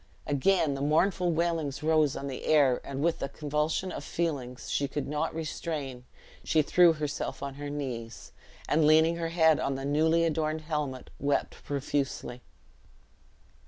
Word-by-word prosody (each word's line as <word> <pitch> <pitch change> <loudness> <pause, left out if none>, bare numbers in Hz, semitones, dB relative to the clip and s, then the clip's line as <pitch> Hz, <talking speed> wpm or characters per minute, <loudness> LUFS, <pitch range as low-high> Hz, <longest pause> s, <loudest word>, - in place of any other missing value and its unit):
Again 150 +2 +2
the 135 - -4
mournful 175 +5 +2
wailings 160 -4 -1
rose 155 -3 +3
on 140 - -5
the 135 -2 -5
air; 140 -5 +4
and 140 +1 -4
with 170 0 +1
a 135 - -2
convulsion 150 +5 -1
of - - -6
feelings 140 -7 -3
she 140 - +1
could 145 0 -4
not 150 +2 -2
restrain, 150 -5 -4 0.4
she 155 -1 +2
threw 175 +2 +5
herself 150 -2 -4
on 140 -1 -4
her 145 +1 -6
knees, 125 -6 -6 0.4
and 150 0 +3
leaning 160 +2 +5
her 165 -1 -2
head 160 -2 +4
on 135 - -1
the 135 0 -5
newly 160 +3 +3
adorned 155 -1 -1
helmet, 150 -5 -4
wept 140 +1 -1
profusely. 135 -3 -3
150 Hz, 155 wpm, -29 LUFS, 140-160 Hz, 0.4 s, threw